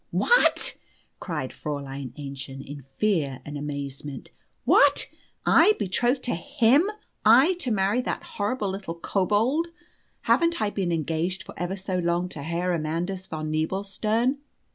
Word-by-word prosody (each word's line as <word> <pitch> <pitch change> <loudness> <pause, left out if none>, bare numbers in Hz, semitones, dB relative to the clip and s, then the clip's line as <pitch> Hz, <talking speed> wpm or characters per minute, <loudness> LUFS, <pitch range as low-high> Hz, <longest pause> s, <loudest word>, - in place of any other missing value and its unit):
"What?" 485 +1 +3 0.4
cried 150 -7 -4
Fräulein 140 -3 -5
Aennchen, 135 -1 -7
in 145 0 -8
fear 140 - -1
and 150 - -7
amazement. 140 -1 -6 0.3
"What? - - +5 0.4
I 425 - +6
betrothed 240 - 0
to 245 - 0
him 275 - +3 0.3
I 255 +11 +6
to 265 - +1
marry 205 +2 +2
that - - -3
horrible 205 -1 -2
little 190 -3 -5
kobold? 210 - +1 0.5
Haven't 335 0 +2
I 210 - 0
been 190 -4 -1
engaged 165 +3 -1
for - - -11
ever 180 +3 -3
so 185 -1 -2
long 175 +1 0
to 150 - -7
Herr 170 +4 -1
Amandus 170 +4 -2
von 155 -1 -4
Nebelstern? 205 - 0
180 Hz, 135 wpm, -26 LUFS, 150-215 Hz, 0.5 s, I